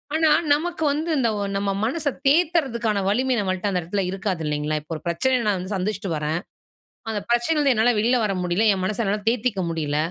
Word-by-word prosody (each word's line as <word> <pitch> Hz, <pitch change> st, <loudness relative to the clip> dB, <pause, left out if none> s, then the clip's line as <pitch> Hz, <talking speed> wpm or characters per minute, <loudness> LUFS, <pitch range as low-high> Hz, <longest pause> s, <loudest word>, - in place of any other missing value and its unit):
ஆனா, 320 Hz, 0 st, +3 dB, 0.2 s
நமக்கு 320 Hz, +2 st, -2 dB
வந்து 310 Hz, +4 st, -2 dB
இந்த 245 Hz, -4 st, +2 dB, 0.3 s
நம்ம 200 Hz, 0 st, 0 dB
மனச 295 Hz, +5 st, -1 dB, 0.2 s
தேத்துறதுக்கான 275 Hz, -, +2 dB
வலிமை 255 Hz, +4 st, +1 dB
நம்மள்ட்ட 185 Hz, 0 st, -1 dB
அந்த 180 Hz, -, 0 dB
இடத்தில 195 Hz, +4 st, -2 dB
இருக்காது 190 Hz, -3 st, -3 dB
இல்லேங்களா! 150 Hz, +1 st, -1 dB
இப்ப 150 Hz, -, -17 dB
ஒரு 155 Hz, -, -7 dB
பிரச்சனைய 250 Hz, +9 st, +1 dB
நான் 205 Hz, -, +2 dB
வந்து 185 Hz, +3 st, -5 dB
சந்திச்சிட்டு 195 Hz, 0 st, -2 dB
வரேன். 150 Hz, +2 st, -1 dB, 0.7 s
அந்த 210 Hz, -, -2 dB
பிரச்சனையிலருந்து 275 Hz, +3 st, +2 dB
என்னால 230 Hz, +2 st, +3 dB
வெளில 235 Hz, +4 st, +3 dB
வர 205 Hz, -, 0 dB
முடியல. 180 Hz, +5 st, +1 dB
என் 185 Hz, -1 st, -3 dB
மனச 215 Hz, +4 st, -1 dB
என்னால 205 Hz, +1 st, -1 dB
தேத்திக்க 230 Hz, -4 st, 0 dB
முடியல. 150 Hz, -3 st, -2 dB
210 Hz, 185 wpm, -23 LUFS, 185-260 Hz, 0.7 s, ஆனா